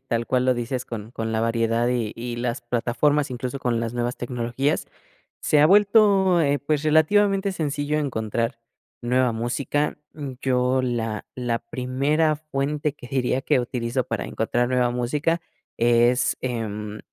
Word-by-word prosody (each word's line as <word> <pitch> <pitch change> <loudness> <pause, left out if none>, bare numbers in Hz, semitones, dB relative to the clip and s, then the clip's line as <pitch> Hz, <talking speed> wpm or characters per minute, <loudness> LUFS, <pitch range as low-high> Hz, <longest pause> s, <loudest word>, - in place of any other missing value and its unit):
tal 115 -1 -1
cual 125 -1 +1
lo 130 -1 +3
dices, 120 +1 -3
con 110 -2 -7
con 115 -1 -4
la 110 - 0
variedad 115 +1 +1
y 120 -4 -1
y 120 0 -5
las 120 +1 -2
plataformas, 125 +5 +1
incluso 125 +2 -4
con 120 -3 0
las 115 0 -3
nuevas 120 0 -1
tecnologías, 125 +3 -1 0.6
se 150 - +3
ha 150 - +7
vuelto, 200 -2 +5
eh, 145 -1 +2
pues, 150 0 -1
relativamente 195 +6 +3
sencillo 150 -3 -1
encontrar 115 -3 -2 0.4
nueva 125 +1 +2
música, 120 +6 -1 0.2
mm, 145 -3 -6
yo 130 0 +2
la 115 -4 -2
la 120 -2 -1
primera 145 +4 0
fuente 150 -1 -2
que 125 - -12
diría, 130 0 0
que 130 - +2
utilizo 120 +1 -2
para - - -3
encontrar 120 +2 0
nueva 125 -1 +2
música 150 +7 0 0.4
es, 120 +1 +3
em, 105 -4 -4
125 Hz, 150 wpm, -24 LUFS, 120-145 Hz, 0.6 s, ha